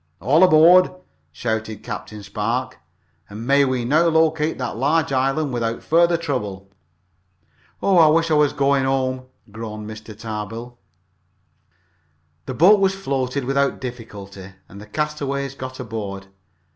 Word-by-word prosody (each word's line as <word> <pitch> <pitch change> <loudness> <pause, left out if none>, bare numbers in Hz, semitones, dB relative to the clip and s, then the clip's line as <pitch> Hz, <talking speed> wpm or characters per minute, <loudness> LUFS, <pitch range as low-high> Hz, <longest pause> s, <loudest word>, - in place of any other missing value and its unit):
"All 140 - +3
aboard!" 180 +1 +6 0.4
shouted 110 +4 -4
Captain 105 -1 -7
Spark. 120 +6 -3 0.5
"And 105 +3 -8
may 140 +2 +4
we 130 -2 -1
now 155 +7 +3
locate 160 -1 +2
that 125 - -4
large 145 +5 +1
island 135 +2 0
without 115 -1 -2
further 170 +1 +3
trouble." 105 - -4 1.1
"Oh, 190 -3 +4
I 160 - +7
wish 165 +1 +2
I - - +4
was 150 -1 +3
home!" 135 -2 0 0.2
groaned 105 -1 -7
Mr. 110 -1 -10
Tarbill. 115 +2 -6 1.7
The 130 - -4
boat 190 - +6
was 195 0 +2
floated 135 -7 -2
without 140 +1 0
difficulty, 100 -6 -9
and 100 - -12
the 105 - -12
castaways 140 0 -3
got 130 -1 -8
aboard. 100 -3 -6
130 Hz, 130 wpm, -21 LUFS, 110-150 Hz, 1.7 s, I